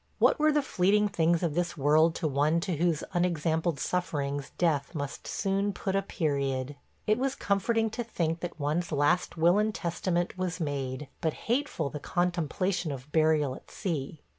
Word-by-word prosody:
What - - +4
were 305 0 +4
the 295 -1 +2
fleeting 205 0 +2
things 170 -2 +2
of 165 -3 0
this 170 +1 -1
world 155 +3 +4
to 160 - -1
one 150 +3 +2
to 175 -3 -2
whose 165 -1 +1
unexampled 165 -2 0
sufferings 145 -6 -2
death 160 -3 +1
must 145 -2 -5
soon 195 0 0
put 190 0 -2
a 195 - +3
period? 140 -7 -1 0.3
It 215 +3 +2
was 270 +1 0
comforting 225 +3 +1
to 240 +2 -3
think 165 -7 -1
that 175 -1 -6
one's 155 +5 -1
last 150 +5 +1
will 170 +5 +4
and 215 0 0
testament 175 +1 -1
was 180 -1 -2
made, 140 -3 -3
but 160 -2 +1
hateful 235 - 0
the 150 - -5
contemplation 175 +1 -1
of 135 +1 -8
burial 155 -4 +3
at - - -12
sea. 155 -5 -4
170 Hz, 170 wpm, -29 LUFS, 150-185 Hz, 0.3 s, What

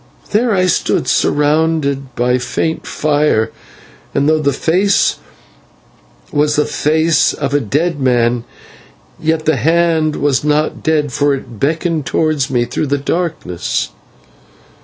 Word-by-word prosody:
There 230 +3 +2
I 185 -3 +2
stood 180 - 0
surrounded 145 -3 +1
by 125 +1 +1
faint 160 +6 -2
fire; 150 -7 +1 0.6
and 140 - +2
though 155 0 +3
the 140 -1 +2
face 180 +8 +1 1.1
was 150 0 +1
the 150 - +2
face 160 +2 +2
of 140 -1 -3
a 145 - +3
dead 145 - -1
man, 120 -2 +1 0.8
yet 160 0 -1
the 155 -3 +2
hand 160 +1 +2
was 140 -1 0
not 150 +1 0
dead, 150 -4 0
for 145 -1 +2
it 120 -5 -10
beckoned 160 +1 -1
towards 155 -4 0
me 120 -2 +1
through 135 +5 -3
the 145 +1 0
darkness. 155 - -2
150 Hz, 130 wpm, -15 LUFS, 135-160 Hz, 1.1 s, though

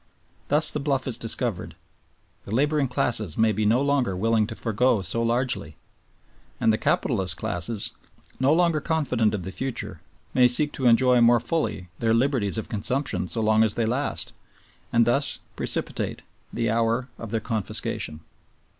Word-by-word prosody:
Thus 150 +1 +4
the 150 - -2
bluff 135 -2 -1
is 125 - -1
discovered; 115 -2 0 0.7
the 105 - -5
laboring 145 +1 +2
classes 110 -7 -1
may 110 0 +3
be 105 0 0
no 120 +5 +3
longer 135 -9 0
willing 110 +1 +1
to 110 - -7
forego 115 -1 +1
so 115 +7 0
largely, 120 - 0 0.8
and 110 - +3
the 110 - -1
capitalist 95 -8 0
classes, 100 +5 -2 0.5
no 130 +2 +3
longer 165 -1 +2
confident 125 -10 0
of 95 - -5
the 95 - -6
future, 130 +4 -5 0.3
may 125 -1 +5
seek 145 +5 +3
to 130 - -1
enjoy 125 +1 +4
more 120 0 +5
fully 120 - -2
their 115 -1 +2
liberties 115 -5 +1
of 110 - -4
consumption 120 0 -1
so 90 +7 -2
long 110 0 +3
as 110 -2 +2
they 115 - 0
last, 125 +6 -2 0.6
and 115 0 +4
thus 135 +5 +1 0.2
precipitate - - -2 0.3
the 115 -1 -1
hour 115 +2 0
of 115 - -7
their 115 +1 -1
confiscation. 105 -8 -3
115 Hz, 160 wpm, -25 LUFS, 110-130 Hz, 0.8 s, may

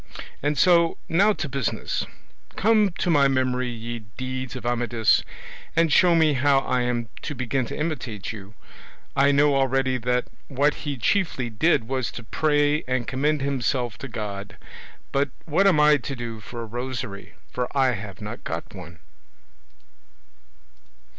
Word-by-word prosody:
And 145 +1 0
so, 170 +2 +4
now 200 +6 +4
to 155 - -4
business; 140 -4 -2 0.5
come 215 -1 +4
to 180 - +1
my 140 -3 +5
memory 130 -1 0
ye 120 0 -5 0.2
deeds 130 0 -4
of 130 - -7
Amadis, 120 -2 +2 0.5
and 165 -2 +3
show 175 -2 +5
me 160 -2 +4
how 135 0 +3
I 125 -2 0
am 120 -2 -1
to 150 - -5
begin 125 0 -1
to - - -6
imitate 145 - -3
you. 100 -1 -11 0.6
I 140 +1 +5
know 145 +1 +4
already 135 -1 +1
that 125 +1 0 0.2
what 145 +2 +2 0.2
he 140 - -3
chiefly 130 - 0
did 115 0 +2
was 130 -3 -1
to 115 - -7
pray 145 +4 +1
and 130 -1 0
commend 145 +3 0
himself 125 -5 -1
to 140 - -6
God; 105 -4 -6 0.5
but 140 0 +1 0.2
what 180 +6 +3
am 175 -6 +4
I 150 0 +6
to 140 +1 -5
do 115 -2 -6
for 115 +3 -7
a - - -5
rosary, 120 -3 -6 0.2
for 125 -1 -2
I 130 -1 +4
have 105 -3 -7
not 105 +3 -7
got 80 +1 -5
one?" 90 -3 -10
130 Hz, 155 wpm, -24 LUFS, 120-145 Hz, 0.6 s, I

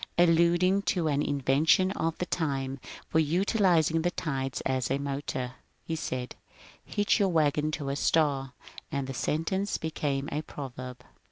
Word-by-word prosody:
" - - -39
Alluding 175 +3 +4 0.2
to 165 -3 +1
an 145 0 +1
invention 145 +7 +3
of 165 -4 -2
the 180 - -2
time 135 -6 -2 0.3
for 160 - +2
utilizing 165 -1 +3
the 175 - +1
tides 135 -7 -3
as 130 -3 -1
a 135 - +1
motor, 140 -3 -3 0.3
he 165 - -3
said, 125 -5 -4
^' - - -31 0.3
Hitch 205 +2 +1
your 200 -2 +3
wagon 155 -2 +2
to 140 -3 -3
a 140 - -1
star," 140 -3 +1 0.4
and 140 -1 -1
the 135 - -5
sentence 165 +9 -1
be 160 - -4
came 140 -2 -1
a 150 - -1
proverb. 130 -4 -8
150 Hz, 165 wpm, -29 LUFS, 135-170 Hz, 0.4 s, Alluding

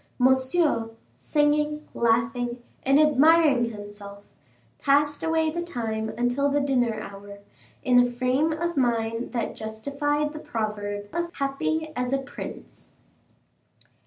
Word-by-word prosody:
Monsieur, 260 -1 +2 0.3
singing, 300 0 +1
laughing, 240 +1 0 0.2
and 275 +2 +4
admiring 300 -3 +5
himself, 205 -2 -9 0.6
passed 290 +1 +2
away 320 -1 +1
the 345 +2 -3
time 225 -9 -3
until 245 +4 +1
the 285 +1 +2
dinner 245 -6 +1
hour, 200 -1 -9 0.5
in 250 -1 +5
a 245 0 +4
frame 255 +6 +1
of 340 +2 -2
mind 230 -3 0
that 235 -3 -2
justified 280 +7 -2
the 305 - -6
proverb 205 -4 -4
of 340 0 -2
"Happy 310 +3 -2
as 250 +1 -1
a - - +3
prince." 270 +1 -9
260 Hz, 120 wpm, -25 LUFS, 230-295 Hz, 0.6 s, admiring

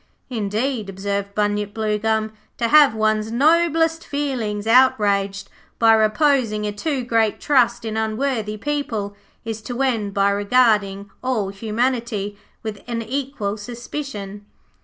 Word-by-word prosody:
'Indeed,' 220 +1 -2
observed 200 +1 -3
Bunyip 205 0 -1
Bluegum, 220 0 0 0.3
'to 235 -1 0
have 290 -5 +6
one's 215 0 +1
noblest 325 +4 +3
feelings 245 -8 -3
outraged 205 -5 +3 0.3
by 225 -1 +5
reposing 220 -1 +2
a 210 - -1
too 260 +5 -2
great 225 -3 +1
trust 240 -4 +2
in 220 -1 -3
unworthy 220 0 -1
people, 225 -7 -3 0.3
is 225 -1 -4
to 245 +3 -6
end 220 -7 -1
by 200 0 +3
regarding 205 -2 +2
all 235 -7 0
humanity 220 0 -2 0.3
with 215 -2 -5
an 230 -1 -3
equal 250 -4 -3
suspicion.' 215 -3 -7
220 Hz, 120 wpm, -21 LUFS, 205-255 Hz, 0.3 s, have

